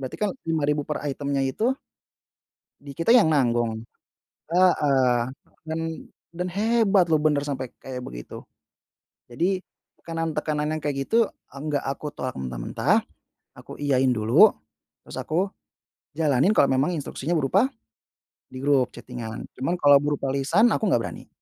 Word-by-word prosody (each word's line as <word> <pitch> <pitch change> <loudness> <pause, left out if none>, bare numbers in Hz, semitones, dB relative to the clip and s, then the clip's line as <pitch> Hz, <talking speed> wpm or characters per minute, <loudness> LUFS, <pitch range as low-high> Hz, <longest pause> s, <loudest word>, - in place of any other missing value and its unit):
Berarti 130 -2 -6
kan 210 -1 -1 0.2
Rp5.000 150 -2 +1
per 150 - -3
item-nya 140 -1 -1
itu 225 - 0 1.0
di 140 -1 -11
kita 170 +8 +3
yang 240 -9 +6
nanggung. 120 -6 +1 0.7
Heeh, 135 -9 +3 0.3
dan 160 0 -4 0.6
dan 180 +1 -2
hebat 205 -2 +3
loh, 160 -2 +3
bener 150 -2 +3
sampai 130 -3 -4
kayak 125 -1 -7
begitu. - - -9 0.9
Jadi 180 +9 0 0.4
tekanan-tekanan 155 -2 -2
yang 155 - -3
kayak 140 -2 -2
gitu 230 +4 +2 0.2
enggak 145 +1 -3
aku 140 +2 -3
tolak 130 -3 -5
mentah-mentah, 60 -2 0 0.5
aku - - -11
iyain 135 -2 +2
dulu, 110 -1 +5 0.5
terus - - -6
aku 185 +5 -1 0.6
jalanin 155 +5 +2
kalau 140 - +5
memang 140 +7 +1
instruksinya 155 +2 -3
berupa 190 - +2 0.8
di 130 - -11
grup 140 -3 +3
chatting-an 120 -3 -7 0.2
cuman 150 +7 0
kalau 145 -5 +6
berupa 145 -2 -1
lisan 165 - +3
aku 215 - 0
enggak 120 -9 +2
berani. - - -8
145 Hz, 135 wpm, -25 LUFS, 130-170 Hz, 1.0 s, yang